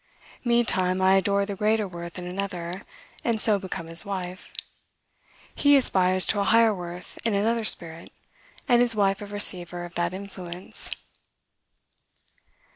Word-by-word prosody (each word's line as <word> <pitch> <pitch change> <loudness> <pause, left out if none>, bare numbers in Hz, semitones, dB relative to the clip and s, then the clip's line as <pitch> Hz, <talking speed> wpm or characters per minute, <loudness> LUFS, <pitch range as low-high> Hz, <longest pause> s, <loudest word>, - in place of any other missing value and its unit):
Meantime, 190 -7 +1
I 190 0 +4
adore 200 +1 +2
the 200 -1 -5
greater 215 +1 +1
worth 170 -1 -9
in 180 - -5
another, 180 -1 -5 0.4
and 230 -2 0
so 210 -2 +4
become 185 -3 -6
his 165 +1 +1
wife. 185 -2 -6 1.0
He 285 0 +4
aspires 185 -7 +3
to 205 - 0
a - - +2
higher 225 +1 +4
worth 175 -1 -9
in 225 -3 0
another 225 +3 0
spirit, 170 -5 -2 0.6
and 240 -3 +4
is 245 -2 +2
wife 195 -1 +1
of 205 0 -8
receiver 180 -4 +4
of 175 - -12
that 175 0 -1
influence. 185 -2 -6
195 Hz, 140 wpm, -25 LUFS, 180-210 Hz, 1.0 s, I